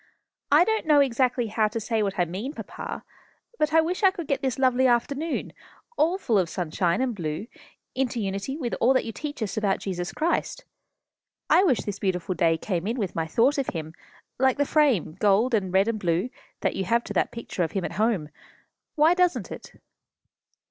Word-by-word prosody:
"I 300 Hz, +4 st, +7 dB
don't 440 Hz, -3 st, -1 dB
know 300 Hz, -2 st, +6 dB
exactly 255 Hz, -2 st, +2 dB
how 215 Hz, 0 st, +1 dB
to 215 Hz, +2 st, -4 dB
say 225 Hz, 0 st, -1 dB
what 200 Hz, -2 st, -1 dB
I 175 Hz, -, +3 dB
mean, 200 Hz, -, -5 dB
papa, -, -, -7 dB, 0.6 s
but 305 Hz, 0 st, +2 dB
I 325 Hz, +1 st, +5 dB
wish 350 Hz, +5 st, -2 dB
I 385 Hz, -, +7 dB
could 370 Hz, -3 st, -6 dB
get 275 Hz, -1 st, -1 dB
this 265 Hz, -3 st, -1 dB
lovely 260 Hz, -1 st, +3 dB
afternoon, 280 Hz, +6 st, -1 dB, 0.4 s
all 335 Hz, +2 st, +2 dB
full 230 Hz, -, +1 dB
of 175 Hz, -3 st, 0 dB
sunshine 175 Hz, +4 st, -1 dB
and 255 Hz, -2 st, -1 dB
blue, 160 Hz, -1 st, -4 dB, 0.5 s
into 255 Hz, -2 st, -1 dB
unity 200 Hz, +7 st, -3 dB
with 250 Hz, -7 st, -3 dB
all 260 Hz, +3 st, +4 dB
that -, -, +2 dB
you 225 Hz, -, -4 dB
teach 290 Hz, 0 st, -5 dB
us 200 Hz, -1 st, -4 dB
about 200 Hz, -3 st, +1 dB
Jesus 175 Hz, -2 st, -4 dB
Christ. 345 Hz, +9 st, -1 dB, 0.9 s
I 370 Hz, -, +6 dB
wish 270 Hz, -, +2 dB
this 205 Hz, -1 st, -5 dB
beautiful 185 Hz, -1 st, -1 dB
day 165 Hz, -1 st, +2 dB
came 180 Hz, +1 st, -3 dB
in 235 Hz, +3 st, -1 dB
with 200 Hz, -7 st, -2 dB
my 165 Hz, -1 st, -2 dB
thought 255 Hz, -, +2 dB
of 270 Hz, -, -1 dB
him, 160 Hz, -2 st, -5 dB, 0.5 s
like 265 Hz, +1 st, +3 dB
the 285 Hz, -, +2 dB
frame 265 Hz, -, +2 dB
gold 210 Hz, +5 st, +3 dB
and 195 Hz, -5 st, +1 dB
red 190 Hz, +3 st, +3 dB
and 230 Hz, -2 st, -1 dB
blue 180 Hz, +6 st, 0 dB, 0.3 s
that -, -, 0 dB
you 190 Hz, -, -2 dB
have 235 Hz, +5 st, +2 dB
to -, -, -6 dB
that -, -, +1 dB
picture 230 Hz, -5 st, -5 dB
of 165 Hz, -2 st, -1 dB
him 195 Hz, -3 st, -1 dB
at -, -, -4 dB
home. 210 Hz, -10 st, +1 dB, 0.7 s
Why 310 Hz, +3 st, +5 dB
doesn't 360 Hz, -1 st, +1 dB
it?" -, -, -9 dB
230 Hz, 205 wpm, -25 LUFS, 190-280 Hz, 0.9 s, I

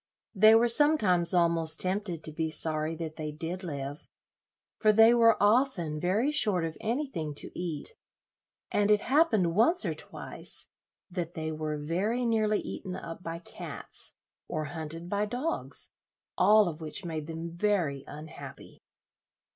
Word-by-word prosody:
They 215 Hz, +2 st, +6 dB
were 235 Hz, +1 st, +4 dB
sometimes 230 Hz, -, +5 dB
almost 170 Hz, -2 st, +5 dB
tempted 185 Hz, -3 st, -2 dB
to 155 Hz, -, -6 dB
be 160 Hz, +1 st, -2 dB
sorry 155 Hz, 0 st, 0 dB
that 160 Hz, -1 st, -7 dB
they 155 Hz, -1 st, -4 dB
did 165 Hz, +5 st, -6 dB
live, 145 Hz, -3 st, -6 dB, 0.7 s
for 215 Hz, -, +4 dB
they 225 Hz, +2 st, +6 dB
were 230 Hz, -1 st, +5 dB
often 205 Hz, -, +1 dB
very 205 Hz, -, +1 dB
short 210 Hz, -, +4 dB
of 160 Hz, -1 st, -5 dB
anything 220 Hz, -, -3 dB
to -, -, -4 dB
eat, 175 Hz, -, -4 dB, 0.8 s
and 205 Hz, 0 st, +1 dB
it 210 Hz, -1 st, +4 dB
happened 245 Hz, -, +2 dB
once 245 Hz, -, +3 dB
or -, -, -1 dB
twice -, -, -5 dB, 0.5 s
that 175 Hz, -1 st, -5 dB
they 160 Hz, -1 st, -4 dB
were 155 Hz, -1 st, -4 dB
very 190 Hz, +11 st, -1 dB
nearly 215 Hz, -2 st, +1 dB
eaten 185 Hz, -2 st, -6 dB
up 165 Hz, -2 st, -8 dB
by 165 Hz, -1 st, -5 dB
cats, 170 Hz, -, -7 dB, 0.3 s
or 155 Hz, 0 st, -3 dB
hunted 160 Hz, +2 st, -6 dB
by 205 Hz, +3 st, -1 dB
dogs, 255 Hz, +9 st, -2 dB, 0.4 s
all 210 Hz, +2 st, +5 dB
of 165 Hz, -1 st, -6 dB
which 160 Hz, +5 st, -6 dB
made 155 Hz, -3 st, -5 dB
them 165 Hz, +1 st, -6 dB
very 170 Hz, -7 st, -1 dB
unhappy. 155 Hz, +1 st, -11 dB
175 Hz, 145 wpm, -29 LUFS, 160-215 Hz, 0.8 s, They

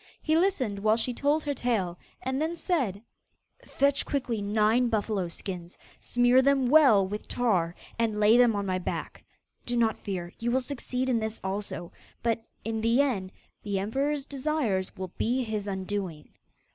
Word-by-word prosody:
He 315 Hz, -, +1 dB
listened 310 Hz, -, +1 dB
while 215 Hz, +2 st, +3 dB
she 245 Hz, +2 st, 0 dB
told 290 Hz, +5 st, +1 dB
her 290 Hz, -, -1 dB
tale, 210 Hz, -10 st, -1 dB, 0.2 s
and 260 Hz, +2 st, -1 dB
then 325 Hz, +2 st, -1 dB
said: 260 Hz, -, -1 dB, 0.6 s
'Fetch 280 Hz, 0 st, +1 dB
quickly 250 Hz, -6 st, -2 dB
nine 215 Hz, +4 st, +3 dB
buffalo 210 Hz, -4 st, 0 dB
skins; 175 Hz, 0 st, -7 dB, 0.2 s
smear 245 Hz, +1 st, +4 dB
them 275 Hz, -1 st, +3 dB
well 260 Hz, -10 st, +6 dB
with 210 Hz, +2 st, -6 dB
tar, 185 Hz, -9 st, +1 dB, 0.2 s
and 220 Hz, -2 st, +1 dB
lay 210 Hz, +2 st, +6 dB
them 240 Hz, -3 st, +5 dB
on 200 Hz, 0 st, -1 dB
my 185 Hz, -1 st, 0 dB
back. 180 Hz, -, -5 dB, 0.4 s
Do 240 Hz, 0 st, -2 dB
not 225 Hz, -2 st, +2 dB
fear; 180 Hz, -4 st, -5 dB
you 235 Hz, -, -1 dB
will 255 Hz, +2 st, +3 dB
succeed 255 Hz, -1 st, -3 dB
in 245 Hz, -3 st, +2 dB
this 220 Hz, 0 st, -3 dB
also; 190 Hz, -2 st, -4 dB, 0.3 s
but, 230 Hz, -1 st, 0 dB, 0.2 s
in 220 Hz, 0 st, -2 dB
the 230 Hz, +3 st, +3 dB
end, 215 Hz, -10 st, +1 dB, 0.3 s
the 200 Hz, -2 st, -2 dB
emperor's 275 Hz, +8 st, -1 dB
desires 265 Hz, -10 st, -1 dB
will 185 Hz, -2 st, -5 dB
be 250 Hz, +3 st, +1 dB
his 215 Hz, -3 st, -3 dB
undoing. 190 Hz, -5 st, -4 dB
225 Hz, 165 wpm, -28 LUFS, 200-260 Hz, 0.6 s, well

